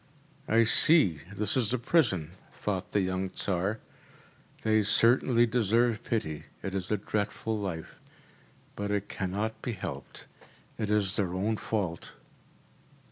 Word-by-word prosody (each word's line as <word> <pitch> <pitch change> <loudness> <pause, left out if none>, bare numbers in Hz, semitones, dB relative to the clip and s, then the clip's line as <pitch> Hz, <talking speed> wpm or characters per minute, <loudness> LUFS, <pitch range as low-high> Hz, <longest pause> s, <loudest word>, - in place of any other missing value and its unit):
“I 115 +2 +5
see 110 - +5
this 100 +1 -1
is 120 -3 +1
a - - +2
prison,‚ÄĚ 95 - 0
thought 95 -3 -3
the 100 - +2
young 95 0 -1
Tsar. 95 +4 -1 0.8
“They 110 -1 +3
certainly 120 +3 +4
deserve 115 0 +2
pity. 80 -10 -2 0.2
It 95 - -4
is 95 -2 -3
a 105 - +1
dreadful 105 +2 -2
life. 95 -6 -5 0.8
But 100 0 -3
it 105 -1 -1
cannot 105 +4 -3
be 120 - -3
helped. 100 - -7 0.5
It 105 - -1
is 105 -2 +1
their 95 -4 0
own 105 +4 0
fault. 95 -6 -3
105 Hz, 135 wpm, -29 LUFS, 95-110 Hz, 0.8 s, I